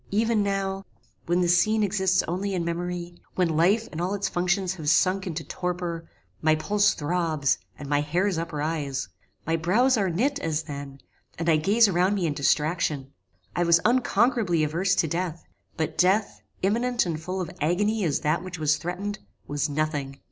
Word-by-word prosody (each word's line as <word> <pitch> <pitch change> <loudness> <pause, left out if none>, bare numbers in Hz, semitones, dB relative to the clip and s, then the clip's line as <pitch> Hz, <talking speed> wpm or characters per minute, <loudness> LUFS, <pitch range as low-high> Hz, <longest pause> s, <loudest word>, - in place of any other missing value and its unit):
Even 220 +1 +2
now, 195 -1 -1 0.4
when 175 +2 +2
this 175 0 +4
scene 215 +3 +2
exists 190 -2 +2
only 190 +4 -2
in 170 -2 -1
memory, 175 0 -4
when 170 -4 +1
life 200 +8 +3
and 165 - -4
all 185 +3 -1
its 200 - -1
functions 180 +1 0
have 155 -5 -3
sunk 185 +4 +3
into 165 -2 -4
torpor, 175 -2 -4 0.3
my 155 0 +4
pulse 205 +6 +2
throbs, 155 -4 0 0.2
and 145 - -8
my 145 0 +2
hairs 175 +4 0
uprise: 150 -3 -3 0.4
my 165 - +1
brows 220 +11 +3
are 195 -3 +1
knit, 265 - 0
as 160 -1 -1
then; 140 -3 -8 0.4
and 165 - -3
I 160 -2 +5
gaze 210 +8 +4
around 185 +1 +2
me 190 -4 0
in 155 - 0
distraction. 150 -1 0 0.4
I 175 - 0
was 170 0 +5
unconquerably 235 -7 +2
averse 175 +5 +1
to 165 - +2
death; 170 0 -3 0.3
but 160 -1 -3
death, 195 +3 +2 0.2
imminent 235 +4 +1
and 160 -3 -3
full 185 +3 -4
of 180 -4 -4
agony 205 +7 +1
as 155 -5 0
that 155 +4 +1
which 185 -1 -6
was 155 -1 +2
threatened, 200 +5 -4 0.3
was 145 +1 -1
nothing. 145 -2 -2
175 Hz, 175 wpm, -26 LUFS, 155-195 Hz, 0.4 s, I